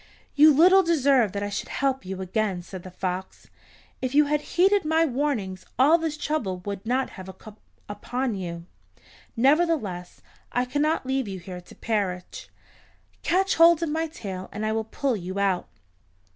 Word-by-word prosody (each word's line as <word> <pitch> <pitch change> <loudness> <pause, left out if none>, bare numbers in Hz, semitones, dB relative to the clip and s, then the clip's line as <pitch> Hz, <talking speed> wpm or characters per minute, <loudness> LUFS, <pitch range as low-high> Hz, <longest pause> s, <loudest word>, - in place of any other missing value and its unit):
"You 305 +2 +7
little 360 +7 +6
deserve 275 - +3
that 200 0 -3
I 205 - -2
should 200 - -4
help 265 -6 -1
you 190 0 -5
again," 190 -1 -1
said 185 +1 -9
the 185 - -10
fox. 185 0 -5 0.5
"If 255 +1 -2
you 300 0 +6
had 295 +1 0
heeded 390 +5 +2
my 320 +1 +2
warnings 245 - -2
all 295 +7 +5
this 320 -2 -3
trouble 270 -12 -2
would 200 -1 -5
not 255 +2 0
have 190 0 -10
come 215 -1 -13 0.3
upon 245 +4 -3
you. 170 -3 -6 0.7
Nevertheless, 265 - +1 0.3
I 245 +1 0
cannot 290 +4 0
leave 265 -2 -1
you 195 -1 -5
here 180 0 -8
to 180 - -16
perish. 195 -5 -3 0.7
Catch 385 +3 +1
hold 335 0 +6
of 330 - -1
my 320 +2 -1
tail, 195 - -7
and 210 +2 -4
I 215 - 0
will 220 0 -1
pull 260 +3 -1
you 185 -1 -6
out." 195 -2 0
245 Hz, 170 wpm, -25 LUFS, 190-300 Hz, 0.7 s, You